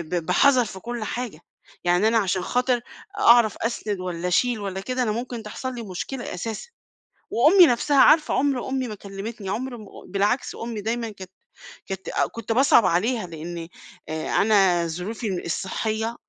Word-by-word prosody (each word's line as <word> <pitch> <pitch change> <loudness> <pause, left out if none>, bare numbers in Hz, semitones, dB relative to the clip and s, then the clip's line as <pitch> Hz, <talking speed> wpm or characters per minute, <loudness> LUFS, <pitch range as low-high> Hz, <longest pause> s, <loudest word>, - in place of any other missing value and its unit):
ب 170 - -2
بحذر 250 +7 +4
في 190 -2 -8
كلّ 235 +1 -5
حاجة، 235 -7 -5 0.4
يعني 180 +4 +3
أنا 225 0 +3
عشان 190 -3 +1
خاطر 250 +4 0 0.4
أعرف 235 -3 +5
أسند 215 -4 -3
والّا 180 -1 -4
اشيل 230 +6 +2
والّا 195 -1 -4
كده، 255 +5 -2
أنا 215 - 0
ممكن 235 0 -4
تحصل 255 +4 -5
لي 235 - -5
مشكلة 225 +6 -5
أساسًا، 220 - -5 0.6
وأُمي 330 +9 +6
نفْسها 265 +4 +1
عارفة 310 -1 +5
عمر 270 -3 0
أُمي 260 -1 -1
ما 215 - -6
كلّمتني 200 +1 -7
عمر 245 +4 -3
م 215 - -11 0.3
بالعكس 205 +6 0
أُمي 230 -2 -5
دايمًا 230 +1 -2
كانت 190 -3 -11 0.5
كانت 190 -1 -6 0.2
كنت 230 0 -6
باصعب 245 -3 +5
عليها 215 +5 +1
لإني 165 +1 -7 0.4
أنا 175 +2 +2
ظروفي 190 +3 -4
الصحّية 220 +6 -2
220 Hz, 155 wpm, -24 LUFS, 190-245 Hz, 0.6 s, وأُمي